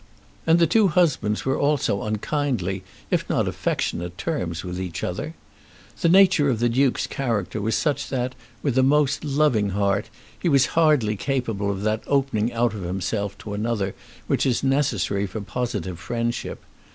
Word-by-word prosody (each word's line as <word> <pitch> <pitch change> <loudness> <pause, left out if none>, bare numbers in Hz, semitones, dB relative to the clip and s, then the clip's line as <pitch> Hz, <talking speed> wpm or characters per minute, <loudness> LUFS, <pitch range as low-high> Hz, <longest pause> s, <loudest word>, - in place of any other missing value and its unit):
And 165 +1 +6
the 170 - +5
two 215 +3 +4
husbands 150 - +1
were 135 0 +1
also 140 -8 +1
on 110 0 -1
kindly, 105 - -1 0.3
if - - 0
not - - +1
affectionate, 90 +1 -2
terms 95 - -3
with 90 0 -4
each 90 -3 -5
other. - - -3 0.6
The 170 - +3
nature 185 -5 +6
of 120 - +1
the 120 +2 +2
Duke's 130 +2 +2
character 110 -6 -2
was 110 +1 0
such 150 -3 0
that, 130 -1 -1 0.3
with 140 -5 0
a - - +6
most 145 +1 +3
loving 140 -8 +2
heart, 100 0 +1 0.3
he 175 - +1
was 135 -3 +5
hardly 150 -10 +3
capable 115 -4 -1
of 100 0 -3
that 110 +1 0
opening 130 -5 +1
out 120 -1 +1
of 105 - -6
himself 95 +3 -2
to 105 - -5
another 105 -2 -1 0.3
which - - +1
is 125 -3 +1
necessary 120 -8 +1
for 100 +4 -5
positive 105 -6 -3
friendship. 115 +7 -3
115 Hz, 165 wpm, -24 LUFS, 100-140 Hz, 0.6 s, And